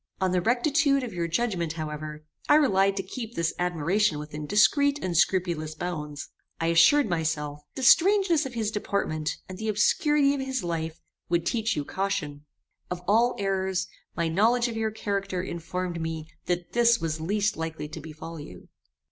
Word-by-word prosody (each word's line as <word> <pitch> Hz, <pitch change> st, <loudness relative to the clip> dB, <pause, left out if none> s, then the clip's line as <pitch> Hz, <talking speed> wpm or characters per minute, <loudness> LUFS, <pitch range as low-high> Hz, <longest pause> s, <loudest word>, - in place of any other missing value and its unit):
On 185 Hz, -1 st, +1 dB
the 180 Hz, -1 st, +2 dB
rectitude 275 Hz, -, +2 dB
of 235 Hz, -5 st, -5 dB
your 170 Hz, -1 st, -2 dB
judgement, 170 Hz, -3 st, -1 dB
however, 155 Hz, -1 st, -6 dB, 0.2 s
I -, -, +7 dB
relied 195 Hz, -9 st, +3 dB
to 195 Hz, -, -1 dB
keep 225 Hz, +4 st, -7 dB
this 170 Hz, -1 st, 0 dB
admiration 175 Hz, +1 st, +1 dB
within 150 Hz, 0 st, -6 dB
discreet 280 Hz, -, +4 dB
and 180 Hz, -7 st, -3 dB
scrupulous 170 Hz, -3 st, +1 dB
bounds. 150 Hz, -4 st, -5 dB, 0.3 s
I 165 Hz, -, +1 dB
assured 190 Hz, -, +5 dB
myself, 155 Hz, -4 st, -2 dB, 0.2 s
that -, -, -5 dB
the 255 Hz, -, +4 dB
strangeness 350 Hz, -3 st, +5 dB
of 250 Hz, -, -10 dB
his 220 Hz, -2 st, -1 dB
deportment, 180 Hz, -7 st, -2 dB
and 185 Hz, 0 st, -9 dB
the 220 Hz, -, -3 dB
obscurity 280 Hz, +7 st, +3 dB
of 280 Hz, -, -2 dB
his 265 Hz, -4 st, -2 dB
life, 165 Hz, -2 st, -3 dB, 0.3 s
would 170 Hz, -1 st, +1 dB
teach 225 Hz, +1 st, 0 dB
you 145 Hz, -, -2 dB
caution. 165 Hz, -7 st, -3 dB, 0.4 s
Of 180 Hz, 0 st, -5 dB
all 235 Hz, +4 st, +3 dB
errors, 190 Hz, -1 st, -1 dB, 0.3 s
my 170 Hz, -1 st, 0 dB
knowledge 230 Hz, +9 st, +3 dB
of 235 Hz, -, -5 dB
your 220 Hz, -1 st, 0 dB
character 200 Hz, -4 st, -3 dB
informed 175 Hz, 0 st, -4 dB
me 160 Hz, -1 st, -4 dB, 0.2 s
that 175 Hz, -1 st, -2 dB
this 235 Hz, 0 st, +4 dB
was 160 Hz, -1 st, -3 dB
least 205 Hz, +5 st, 0 dB
likely 160 Hz, -2 st, -4 dB
to 160 Hz, +1 st, -8 dB
befall 160 Hz, +1 st, -9 dB
you. 90 Hz, -11 st, -11 dB
185 Hz, 175 wpm, -27 LUFS, 160-225 Hz, 0.4 s, I